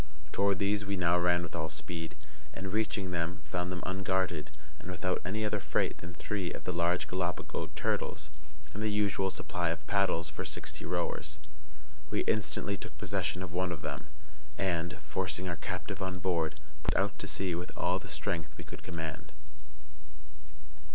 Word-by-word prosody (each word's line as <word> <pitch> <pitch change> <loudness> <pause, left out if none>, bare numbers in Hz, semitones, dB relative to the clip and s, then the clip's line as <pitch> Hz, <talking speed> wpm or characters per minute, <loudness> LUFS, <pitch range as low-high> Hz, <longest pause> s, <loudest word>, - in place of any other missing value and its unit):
Toward 100 -1 +4
these 100 +2 +3
we 100 -1 0
now 90 -1 +5
ran 85 0 +5
with 85 - -5
all 80 -1 0
speed, 80 0 -3 0.4
and, 95 0 -3
reaching 105 -3 +1
them, 85 +3 0
found 90 0 -1
them 90 -1 -2
unguarded, 95 -4 +1 0.3
and - - -7
without 90 0 0
any 110 +3 0
other 105 0 +2
freight - - +1
than 85 +1 -7
three 95 0 -1
of - - -5
the 90 - 0
large 85 +1 +3
Gallipago 90 -2 -1
turtles 75 0 0 0.4
and 105 - -3
the 110 - +3
usual 100 -2 +3
supply 85 -2 0
of 80 -2 -2
paddles 90 -2 +3
for - - -3
sixty - - -3
rowers. 75 0 0 0.7
We - - +2
instantly 100 -1 +1
took - - -8
possession 90 - 0
of 90 - -5
one 90 0 +2
of 85 - -4
them, - - -3 0.5
and, 85 -2 +1
forcing 90 +4 0
our 85 -2 -1
captive - - -3
on 95 0 0
board, 80 -4 +1 0.2
pushed - - +2
out 100 +2 +2
to 100 - -2
sea 95 -2 +1
with 90 +2 -2
all 90 +2 +3
the - - -9
strength 80 -1 -2
we - - -6
could - - -8
command. 80 -3 -4
90 Hz, 170 wpm, -33 LUFS, 85-95 Hz, 0.7 s, now